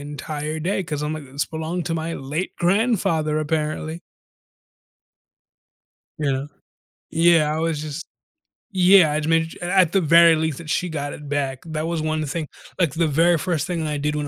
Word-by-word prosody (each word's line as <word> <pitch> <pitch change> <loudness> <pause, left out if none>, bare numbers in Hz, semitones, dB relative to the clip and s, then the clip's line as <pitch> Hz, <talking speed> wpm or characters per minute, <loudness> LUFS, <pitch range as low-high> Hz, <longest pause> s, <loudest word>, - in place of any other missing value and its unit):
entire 150 +2 -5
day 190 +3 -1
'cause 150 -4 -4
I'm 150 +1 -2
like, 155 -2 -6
"This 140 +3 -2
belonged 160 +2 -4
to 165 - -1
my 165 +1 -3
late 150 +7 -4
grandfather, 175 -6 +1
apparently." 155 +1 -2 2.2
You 145 -3 0
know? 135 +2 -3 0.6
Yeah, 165 -2 +4
I - - -2
was 160 -2 -1
just 155 +2 -5 0.7
Yeah, 185 -4 +6
I'd 155 0 -1
made 165 0 +1
it - - -10
i - - -3
at 180 -3 +4
the 195 - +2
very 165 +1 +6
least 160 -2 -2
that 165 - -9
she 180 +3 0
got 145 -3 -4
it 145 -1 -10
back. 140 -2 -2
That 160 0 -3
was 170 -2 -2
one 155 0 -1
of 155 - -1
the 140 - -5
thing 165 -3 -3 0.3
like, 160 -6 +2
the 165 -1 +1
very 165 +4 +3
first 160 -1 -1
thing 170 -3 -2
that 150 - -2
I 150 - -1
did 150 +1 -1
when 145 -1 -2
160 Hz, 200 wpm, -22 LUFS, 150-170 Hz, 2.2 s, Yeah